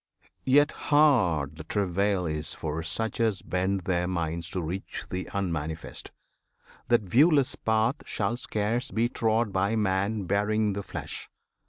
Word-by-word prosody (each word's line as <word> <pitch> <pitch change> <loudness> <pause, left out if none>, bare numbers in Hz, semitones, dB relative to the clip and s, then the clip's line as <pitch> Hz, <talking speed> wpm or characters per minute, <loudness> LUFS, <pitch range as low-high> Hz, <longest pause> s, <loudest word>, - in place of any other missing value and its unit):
Yet, 145 +3 +5 0.2
hard 105 - +3
The 80 - -7
travail 100 +1 0
is 75 -1 -2
for 80 0 -3
such 110 +9 -3
as 110 -4 +1
bend 95 +1 0
their 90 0 0
minds 85 -2 -2
To 95 - -2
reach 90 +5 -5
th' 90 0 -3
Unmanifest 80 -5 -3 0.8
That 120 -2 +3
viewless 140 - +4
path 110 +5 +1
Shall 105 +2 -1
scarce 115 0 -1
be 115 +2 +1
trod 110 -2 +1
by 100 +4 +1
man 100 0 0
bearing 105 +2 +1
the 100 - -3
flesh! - - -6
100 Hz, 140 wpm, -27 LUFS, 90-110 Hz, 0.8 s, Yet